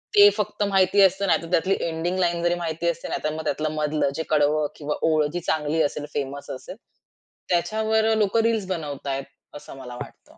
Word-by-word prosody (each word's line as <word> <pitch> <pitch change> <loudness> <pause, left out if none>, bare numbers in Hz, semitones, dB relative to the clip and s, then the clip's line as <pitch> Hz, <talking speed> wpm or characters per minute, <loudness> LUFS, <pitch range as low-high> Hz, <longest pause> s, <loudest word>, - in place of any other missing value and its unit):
ते 205 0 +9
फक्त 210 0 -1
माहिती 195 0 +3
असतं. 195 +1 +4
नाहीतर 165 -1 +1
त्यातली 185 +3 +2
एंडिंग 170 +2 -2
लाईन 175 -1 +1
जरी 175 0 +2
माहिती 170 -1 -3
असते 170 - -4
नाहीतर 155 - -2
मग 160 0 -5
त्यातलं 155 +1 -1
मधलं 150 -2 0
जे 160 - -2
कडवं 150 0 +2
किंवा 150 0 -3
ओळ 155 -1 +3
जी 175 - -1
चांगली 155 -1 0
असेल 145 0 -2
फेमस 140 0 -4
असेल 130 +7 -7 0.7
त्याच्यावर 220 +5 +2
लोकं 215 +2 +2
रील्स 225 -4 +1
बनवतायत. 145 -6 -3 0.3
असं 145 - -10
मला 125 -2 -8
वाटतं. - - -11
165 Hz, 180 wpm, -24 LUFS, 150-190 Hz, 0.7 s, ते